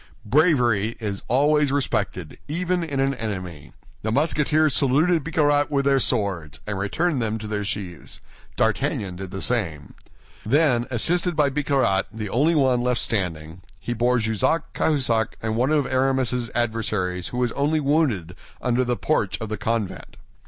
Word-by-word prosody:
Bravery 120 - +2
is 100 -3 -4
always 145 +3 +3
respected, 105 - -2
even 180 +3 -1
in 145 -4 -3
an 135 0 +2
enemy. 90 - -6 0.3
The 110 - -2
Musketeers 150 +2 +2
saluted 155 +4 +3
Bicarat 145 -2 +2
with 140 -2 0
their 135 -1 +4
swords, 100 -11 -1
and 105 -2 -3
returned 140 - 0
them 110 -1 -1
to 110 - -8
their 105 -1 -3
sheaths. 100 -6 -6 0.4
D'Artagnan 95 -3 0
did 95 0 -6
the 95 +1 -5
same. 85 - -2 0.5
Then, 125 -1 +2
assisted 170 +8 +1
by 145 -2 +2
Bicarat, 135 -9 +1
the 110 -2 -5
only 150 +8 +2
one 130 -4 +3
left 125 -1 0
standing, 85 -5 -3 0.2
they 120 - -1
bore 120 +2 +2
Jussac, 110 - 0
Cahusac, 125 -8 +1
and 110 0 -2
one 125 +4 +1
of 150 -2 +2
Aramis's 130 -2 0
adversaries 105 -6 -1
who 125 - -6
was 125 -1 +1
only 150 +4 +1
wounded, 135 - 0 0.2
under 125 0 +1
the 120 -1 -1
porch 110 -11 0
of 110 - -5
the 110 - -3
convent. 110 -2 -3
120 Hz, 155 wpm, -23 LUFS, 105-145 Hz, 0.5 s, their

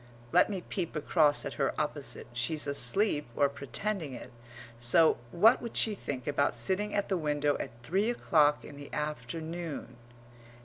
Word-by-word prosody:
(Let 180 - +5
me 195 -3 -3
peep 175 -5 -3
across 150 -1 +2
at - - -4
her - - 0
opposite; - - -3
she's 125 +5 -1
asleep 145 - 0
or 140 - +4
pretending 155 +3 -3
it; 120 - -9 0.4
so 120 +8 +4
what 215 - +5
would 235 - -3
she 220 - +4
think 135 - -5
about 140 -3 +1
sitting 190 - -1
at 205 -1 0
the 190 - 0
window 150 -2 0
at - - -4
three 195 - +1
o'clock 150 -10 +2
in 145 - -11
the 145 0 -10
afternoon? 155 +3 -5
155 Hz, 160 wpm, -30 LUFS, 140-190 Hz, 0.4 s, Let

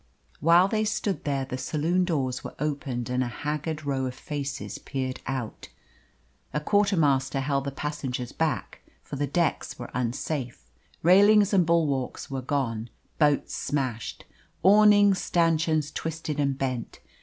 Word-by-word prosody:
While 170 +4 +5
they 215 +1 0
stood 210 -2 -2
there 140 -2 0
the 130 0 -5
saloon 165 +6 0
doors 135 -7 -1
were - - -8
opened 140 -5 -3
and 125 +1 0
a - - -2
haggard 150 +5 -4
row 135 -2 -1
of 125 - -6
faces 140 0 -5
peered 130 -2 -4
out. 130 -4 -4 0.9
A - - +2
quarter 205 +4 +2
master 135 -3 +2
held 140 0 0
the 140 - -2
passengers 135 -4 -4
back, 160 -6 -2 0.2
for - - -7
the 145 +1 -1
decks 165 +2 -1
were 120 - -8
unsafe. 125 - -3 0.4
Railings 205 +4 +6
and 180 -4 +4
bulwarks 145 -7 0
were 135 -1 -2
gone, 125 -4 -2 0.3
boats 145 -2 +2
smashed, 130 -6 -3 0.4
awning 205 0 +6
stanchions 165 -4 +1
twisted 160 -2 -4
and 140 -2 +1
bent. 130 -4 -3
145 Hz, 145 wpm, -26 LUFS, 130-165 Hz, 0.9 s, Railings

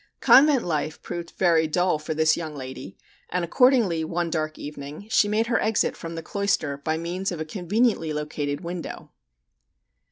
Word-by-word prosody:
Convent 275 -2 +6
life 155 -2 -2
proved 170 -1 -5
very 165 -3 +3
dull 175 0 +1
for 155 +1 -4
this 155 0 +3
young 160 -3 -5
lady, 130 -8 -8 0.3
and 180 0 -1
accordingly 220 -5 +3
one 170 +1 -2
dark 155 -1 -2
evening, 145 +4 -8
she 210 - +4
made 215 +2 +1
her 230 -1 +1
exit 220 0 +1
from 165 -1 -7
the 165 - -6
cloister 200 -7 -1
by 160 +3 -2
means 180 +4 -3
of 175 - -5
a 155 - -3
conveniently 190 +1 0
located 150 -1 -3
window. 175 -1 -7
165 Hz, 165 wpm, -25 LUFS, 155-195 Hz, 0.3 s, Convent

